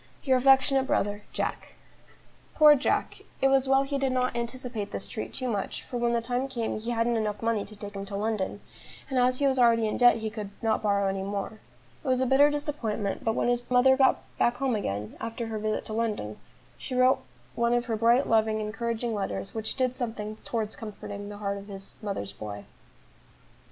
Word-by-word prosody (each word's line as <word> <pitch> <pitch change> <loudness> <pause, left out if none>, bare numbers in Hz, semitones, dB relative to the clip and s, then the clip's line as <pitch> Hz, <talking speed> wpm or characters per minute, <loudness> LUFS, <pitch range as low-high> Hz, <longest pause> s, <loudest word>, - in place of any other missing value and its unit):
"Your 265 -3 +3
affectionate 270 +1 +4
brother, 205 -3 0
"JACK." - - -3 0.8
Poor 300 -1 +8
Jack! 285 -1 0 0.2
it 270 - +4
was 270 0 +3
well 270 0 +5
he 275 0 -2
did 270 -1 +1
not 255 0 0
anticipate 235 -2 -4
this - - -5
treat 215 - -6
too 255 - -4
much, 205 -5 -3
for 245 - -5
when 235 0 +1
the 235 -1 0
time 250 +2 -1
came 235 -5 -3
he 225 +2 -5
hadn't 235 0 +1
enough 210 0 -2
money 225 -3 +1
to 215 - -11
take 205 0 -8
him 195 0 -5
to 200 - -5
London, 205 -1 -2 0.5
and 260 - +2
as 250 +1 +3
he 285 - +1
was 265 -1 +2
already 230 -2 +5
in 215 - -2
debt 245 -1 +7
he 220 -1 -4
could 210 -2 -5
not 220 -1 +1
borrow 200 -2 +2
any 195 0 -1
more. 200 +2 -4 0.4
It - - -8
was 255 -1 +2
a 260 - +2
bitter 270 +3 +5
disappointment; 280 -9 -2
but 225 0 +1
when - - +1
his 245 0 +2
mother 255 +1 +5
got 265 0 +3 0.2
back 240 +1 +2
home 265 -2 0
again 105 - -3
after 230 +1 -4
her 220 -1 -4
visit 215 0 -2
to 215 - -6
London, 215 - -2 0.4
she 255 - -5
wrote 255 +1 +4 0.3
one 235 0 +2
of 240 0 0
her 230 -2 -1
bright, 235 +5 +4
loving, 220 -1 +2
encouraging 230 +2 -2
letters, 100 - -3
which 220 -1 -3
did 255 -2 +1
something 220 -4 -4
towards 220 -2 -3
comforting 205 -2 -7
the 205 - -8
heart 200 -1 -2
of 200 - -12
this 195 -1 -6
"mother's 195 - -4
boy." 105 0 -7
230 Hz, 205 wpm, -28 LUFS, 210-255 Hz, 0.8 s, Poor